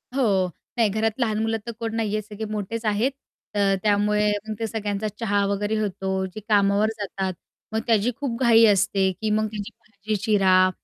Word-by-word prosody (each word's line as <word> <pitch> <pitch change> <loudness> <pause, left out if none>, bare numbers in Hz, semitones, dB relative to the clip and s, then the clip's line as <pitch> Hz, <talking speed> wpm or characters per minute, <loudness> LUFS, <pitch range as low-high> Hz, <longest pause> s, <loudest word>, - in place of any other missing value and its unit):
हो, 195 -8 +2 0.3
नाही. 225 -3 +4
घरात 220 +3 -1
लहान 220 -3 +1
मुलं 225 0 0
तर 235 - -4
कोण 225 -1 -3
नाही 215 -2 -1
आहे, 215 - 0
सगळे 210 +1 -7
मोठेच 215 +2 -4
आहेत. 215 +5 +1 0.4
अ, 205 - -1 0.2
त्यामुळे 210 0 +2 0.2
मग 220 - -2
ते 225 - -1
सगळ्यांचा 210 -1 -2
चहा 205 -3 +1
वगैरे 205 +2 -1
होतो. 190 -2 -2
जे 190 +3 -8
कामावर 200 +1 +4
जातात, 190 -2 -3 0.4
मग 220 - +1
त्याची 225 +1 +3
खूप 245 -5 -3
घाई 230 -2 +6
असते, 195 -2 +3
की 215 - 0
मग 215 +1 +2
त्याची 205 -2 -6
भाजी 215 0 -5
चिरा 190 -4 +4
210 Hz, 185 wpm, -24 LUFS, 200-220 Hz, 0.4 s, घाई